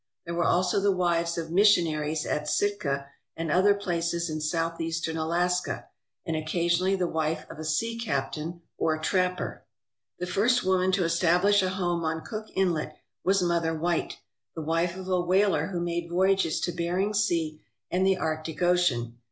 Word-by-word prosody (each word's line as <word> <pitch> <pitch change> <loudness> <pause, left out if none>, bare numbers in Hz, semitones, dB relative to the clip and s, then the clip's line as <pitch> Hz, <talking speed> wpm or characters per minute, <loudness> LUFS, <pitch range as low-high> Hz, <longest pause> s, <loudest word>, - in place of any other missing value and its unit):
There 170 - -4
were 170 0 +1
also 180 +2 +2
the 200 0 +3
wives 170 -2 0
of 165 -1 -4
mission 200 -1 +5
aries 155 0 -2
at 150 0 -2
Sitka 150 -9 0 0.3
and 165 -2 -2
other 200 +4 +5
places 170 -3 -2
in 155 0 -3
Southeastern 165 +1 -2
Alaska, 175 +3 -1 0.4
and 165 - -2
occasionally 170 +4 +1
the 185 -2 0
wife 160 -1 -1
of - - -11
a - - -5
sea 230 +10 -1
captain 160 - -3 0.2
or 160 -1 +1
trapper. 180 +3 -1 0.5
The 180 - -3
first 235 +7 +2
woman 185 0 +2
to 185 - +2
establish 175 +4 +3
a 185 - 0
home 175 -2 -1
on 160 0 -2
Cook 215 -1 -6
Inlet 175 -5 0 0.3
was 195 0 +3
Mother 165 -2 +1
White, 170 +1 -1 0.4
the 160 - -4
wife 165 +3 0
of 190 -1 -7
a 185 -1 +2
whaler 190 +3 +2
who 180 -3 -3
made 170 0 -2
voyages 190 -1 +2
to 175 - 0
Bering 175 +4 -1
Sea 170 -7 0 0.3
and 180 +1 +1
the 190 0 +3
Arctic 155 0 -3
Ocean. 125 -10 +1
170 Hz, 170 wpm, -27 LUFS, 160-185 Hz, 0.5 s, mission